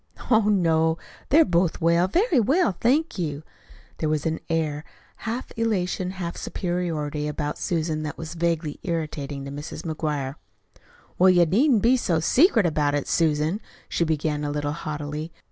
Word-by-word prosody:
"Oh, 220 -1 +5
no, 165 -4 +3 0.3
they're 315 +3 +6
both 175 -1 +1
well 170 +2 +3
very 350 - +2
well, 285 - +3
thank 280 - +2
you." 150 -3 -3 0.6
There 155 - 0
was 155 0 -1
an 160 0 -1
air, 155 -2 -1 0.4
half 235 +3 -3
elation, 185 -5 -1
half 170 -2 -4
superiority, 160 -5 -2
about 150 0 -3
Susan 160 -2 -1
that 150 -1 -5
was 160 0 -6
vaguely 165 -3 -1
irritating 150 -5 -3
to 140 - -6
Mrs. 145 +2 -7
McGuire. 150 -4 -3 0.8
"Well, 185 +1 +7
you 175 -1 +5
needn't 225 - +3
be 250 +3 +5
so 170 -9 +1
secret 235 - +4
about 150 -3 +1
it, 145 - -2
Susan," 160 +5 +1 0.3
she - - 0
began 155 -2 -1
a 145 - -1
little 145 0 -2
haughtily. 150 +1 -5
165 Hz, 155 wpm, -24 LUFS, 150-185 Hz, 0.8 s, Well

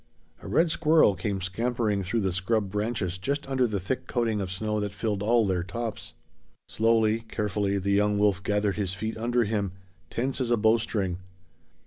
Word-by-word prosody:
A - - -9
red 165 0 +3
squirrel 155 -9 +4
came 95 +2 -3
scampering 110 +2 -1
through 100 +5 -1
the 95 -2 0
scrub 95 +2 0
branches 105 -4 -2
just 140 +7 -2
under 130 -2 +2
the 105 -3 -2
thick 100 +8 -3
coating 115 -4 0
of 95 -2 -4
snow 105 +3 -1
that 105 -1 -3
filled 105 -2 -2
all 115 +1 +3
their 95 -3 0
tops. 110 +4 -5 0.5
Slowly, 110 0 +2
carefully 100 -1 -1
the 100 +1 -1
young 105 +1 +3
wolf 100 -2 +2
gathered 105 0 0
his 95 -3 -1
feet 110 +3 -3
under 120 +2 +1
him, 100 -3 -1 0.4
tense 130 +2 -2
as 125 - -1
a 120 - +3
bowstring. 110 -4 +1
105 Hz, 175 wpm, -27 LUFS, 100-115 Hz, 0.5 s, squirrel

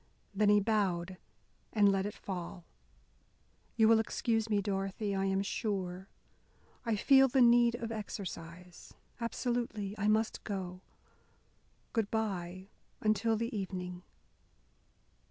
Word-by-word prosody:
Then 205 +1 +3
he 205 0 +6
bowed, 190 -4 0 0.6
and 205 -2 +5
let 195 0 0
it 205 - -7
fall. 180 -2 -6 1.1
"You 220 -1 +5
will 225 0 +6
excuse 225 0 0
me, 210 -2 +2
Dorothy, 195 +1 -2
I 195 0 0
am 195 0 +1
sure. 190 -3 -3 0.8
I 230 -2 0
feel 270 +5 +6
the 265 +1 +1
need 240 -1 +6
of 230 -1 -5
exercise. 180 -5 -7 0.2
Absolutely 230 -4 -2
I 205 - +1
must 220 +1 +1
go; 185 -3 -5 1.1
good 225 -3 0
by 190 -4 -3 0.3
until 215 +1 +2
the 230 +1 -3
evening." 180 -2 -4
205 Hz, 120 wpm, -32 LUFS, 190-225 Hz, 1.1 s, he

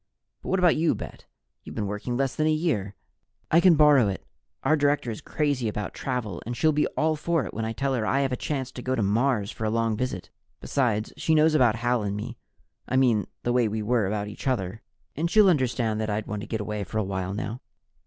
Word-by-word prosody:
But - - -7
what 190 - +2
about 180 -3 +4
you, 160 +1 +2
Bet? - - -9 0.4
You've - - -10
been 105 - -2
working 105 +5 -3
less 135 -1 0
than 155 - +1
a - - +3
year." 135 - -1 0.6
"I 165 - +6
can 175 -1 +6
borrow 145 -6 +6
it. 95 -1 -4 0.4
Our 155 - +4
director 145 -4 +1
is 110 - -7
crazy 145 -6 -1
about 105 -2 -3
travel 125 -8 -3
and 120 +1 -5
she'll 155 +4 +3
be 150 0 +1
all 155 0 +2
for 155 -2 0
it - - -7
when 110 +1 -3
I 110 - -2
tell 135 +4 -1
her 120 -4 0
I 135 +5 +1
have 135 -1 0
a - - +1
chance 130 0 -3
to 125 - -8
go 130 +1 -1
to 115 - 0
Mars 110 +1 +1
for - - -7
a 110 - +1
long 115 0 +1
visit. 115 -6 -4 0.3
Besides, 115 -6 0
she 160 - +2
knows 155 +1 +4
about 125 -7 +4
Hal 120 0 0
and 100 0 -2
me 115 +3 -5 0.5
I - - 0
mean 120 -7 +3 0.2
the 120 - 0
way 125 -2 +3
we 110 0 -2
are 110 -2 +1
about 105 +1 -2
each 105 +5 -7
other 110 -5 -1 0.3
and 165 +4 -1
she'll 210 +2 +6
understand 120 - +1
that 110 - -2
I'd 105 0 -2
want 105 -1 -4
to 115 - -7
get 110 -2 -2
away 105 0 -3
for 110 - -5
a 110 - +2
while 95 0 -3
now." 110 +3 -4
120 Hz, 240 wpm, -26 LUFS, 105-145 Hz, 0.6 s, I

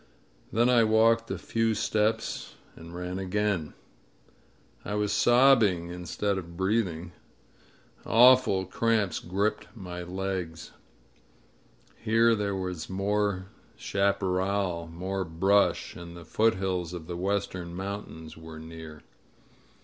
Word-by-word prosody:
Then 120 +2 +3
I 120 -2 +5
walked 115 +1 +3
a - - -2
few 115 -1 0
steps 110 +1 -1 0.2
and 85 +1 -11
ran 90 +1 -4
again. 95 -3 -1 1.1
I 105 - -3
was 105 -1 0
sobbing 120 -9 +4
instead 95 +3 -2
of 85 -2 -10
breathing. 95 -4 -1 0.9
Awful 120 -5 +5
cramps 110 0 0
gripped 100 +4 -1
my 90 -4 -7
legs. 90 -2 -4 1.3
Here 115 +1 +3
there 100 -2 -1
was 90 -4 -4
more 100 0 0 0.3
chaparral, 95 -2 0
more 95 +3 -3
brush, 95 +5 +1
and 85 0 -9
the 85 - -11
foothills 95 -4 0
of 85 -3 -7
the 85 +1 -5
western 90 -2 -2
mountains 95 -5 -6
were 80 0 -10
near. 80 -1 -10
95 Hz, 110 wpm, -28 LUFS, 85-105 Hz, 1.3 s, I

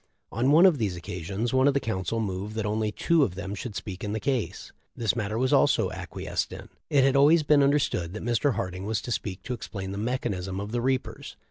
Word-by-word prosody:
On 125 +3 +1
one 160 +5 +7
of 170 -7 +5
these 100 -5 -1
occasions 95 +7 -4
one 130 +1 +4
of 140 - +3
the - - +4
counsel 110 -2 -2
moved 100 0 -3
that 110 -1 -2
only 105 0 0
two 165 +9 +2
of 100 -11 +1
them 100 +1 -5
should 105 0 -6
speak 95 +2 -6
in 105 0 -2
the 110 - -1
case. 110 -5 -2 0.2
This 115 -1 0
matter 105 -1 -2
was 130 +2 +1
also - - +3
acquiesced - - -4
in. - - -9 0.2
It 140 -2 +4
had 135 0 +3
always 150 +4 +6
been 145 -1 +4
understood 135 - +1
that - - -6
Mr. 120 +3 +1
Harding 90 0 -4
was 110 -1 0
to 120 - -5
speak 100 -4 -3
to 125 - -3
explain 95 -5 -6
the 100 - -4
mechanism 100 -6 -2
of 100 +1 -5
the 120 0 -1
reapers. 130 0 -2
110 Hz, 230 wpm, -27 LUFS, 100-130 Hz, 0.2 s, one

